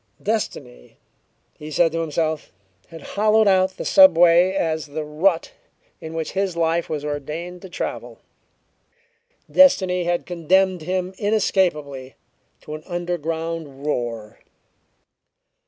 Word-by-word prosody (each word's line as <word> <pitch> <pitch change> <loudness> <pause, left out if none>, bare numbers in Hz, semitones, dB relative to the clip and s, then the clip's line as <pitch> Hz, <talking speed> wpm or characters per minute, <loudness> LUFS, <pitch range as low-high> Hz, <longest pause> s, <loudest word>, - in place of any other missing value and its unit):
Destiny, - - -4 0.6
he 150 - -8
said 165 +2 +2
to 165 +1 -2
himself, 160 -1 -2 0.4
had 165 -3 -12
hollowed 215 +1 +2
out 190 -1 +2
the - - -5
subway 175 - +6
as 160 -5 -1
the 155 +2 -5
rut 165 +4 0 0.5
in 160 0 -8
which 160 -1 -3
his 195 -3 -2
life 165 0 0
was 150 -2 -4
ordained 155 +5 -5
to 190 - -10
travel; 175 - -5 1.3
destiny 185 -10 +4
had 175 0 -1
condemned 185 +1 +1
him 185 +3 -3
inescapably 175 -11 0 0.5
to 150 - -9
an 155 - -7
underground 165 -4 -4
roar. 115 -6 -4
165 Hz, 115 wpm, -22 LUFS, 150-185 Hz, 1.3 s, subway